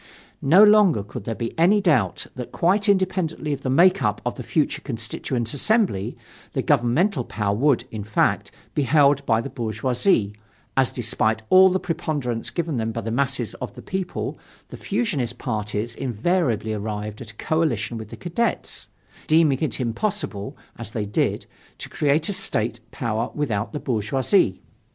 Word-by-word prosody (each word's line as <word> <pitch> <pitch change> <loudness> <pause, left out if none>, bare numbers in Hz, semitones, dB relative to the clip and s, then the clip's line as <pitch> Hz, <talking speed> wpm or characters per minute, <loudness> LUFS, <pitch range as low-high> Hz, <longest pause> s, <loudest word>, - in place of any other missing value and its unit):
No 175 +9 +6
longer 210 - +5
could 105 +1 -8
there 115 - -3
be 115 -1 -4
any 190 +6 +5
doubt 125 - +1
that 125 -2 -7
quite 200 +5 +2
independently 185 -6 0
of 140 - -5
the 130 - -2
make 180 +8 +5
up 105 -2 0
of 125 - -1
the - - -8
future 155 -3 0
Constituent 120 -1 -3
Assembly, 190 - +1 0.4
the - - -1
governmental 130 - +2
power 100 -3 -2
would, 130 +1 +2
in 110 -2 -5
fact, 105 +1 +1 0.2
be 150 - +1
held 140 +1 +4
by 115 0 +3
the 140 - -6
bourgeoisie, 120 - 0 0.4
as 135 -2 +3
despite 110 -2 -1
all 190 0 +8
the 185 +1 0
preponderance 150 -9 -3
given 165 -5 -2
them 115 -1 -1
by 115 - -4
the 115 +1 -4
masses 130 -2 0
of - - -5
the - - -10
people 190 -1 -4 0.3
the - - -8
fusionist 165 - -2
parties 110 -1 -3
invariably 120 - 0
arrived 105 0 -4
at 115 - -8
a 110 - -13
coalition 135 -7 -1
with 110 -1 -8
the - - -9
Cadets, 180 +7 -2 0.4
deeming 155 -4 +4
it 150 -8 -2
impossible, 120 - -3 0.2
as - - -5
they 110 -1 -3
did, 105 - -1 0.3
to - - -7
create 150 +2 +1
a 205 - -1
state 115 - -1
power 115 -1 -2
without 110 -8 -1
the 150 - -4
bourgeoisie. 120 - +1
130 Hz, 165 wpm, -23 LUFS, 110-165 Hz, 0.4 s, all